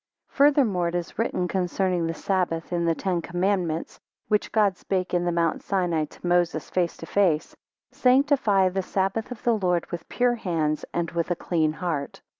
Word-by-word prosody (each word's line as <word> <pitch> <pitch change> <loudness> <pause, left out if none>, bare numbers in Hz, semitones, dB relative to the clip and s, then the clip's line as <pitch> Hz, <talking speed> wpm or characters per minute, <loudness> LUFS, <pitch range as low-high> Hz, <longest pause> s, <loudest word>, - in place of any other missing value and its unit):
FURTHERMORE 270 -11 +3
it 170 - -3
is 175 +3 -4
written 185 -5 0
concerning 180 -1 0
the 165 - -2
sabbath, 180 -3 -1
in 170 -1 0
the 165 -1 +2
Ten 180 -2 -1
Commandments, 175 -2 -1 0.3
which 210 -1 +1
God 210 -3 +3
spake 185 0 -2
in 175 0 +1
the 175 - +1
mount 170 -1 0
Sinai 175 -5 0
to 150 - -14
Moses, 175 -1 +1
face 175 -2 0
to - - -8
face: 170 -5 +1 0.4
Sanctify 250 -7 +3
the 190 +1 -1
sabbath 195 +4 -1
of 245 -3 -8
the 240 - +3
Lord 180 -5 +1
with 170 -2 -6
pure 245 0 +2
hands, 165 -9 -1
and 170 -1 -2
with 170 0 -2
a 175 - +1
clean 160 -3 0
heart. 155 -4 -3
180 Hz, 180 wpm, -25 LUFS, 170-200 Hz, 0.4 s, FURTHERMORE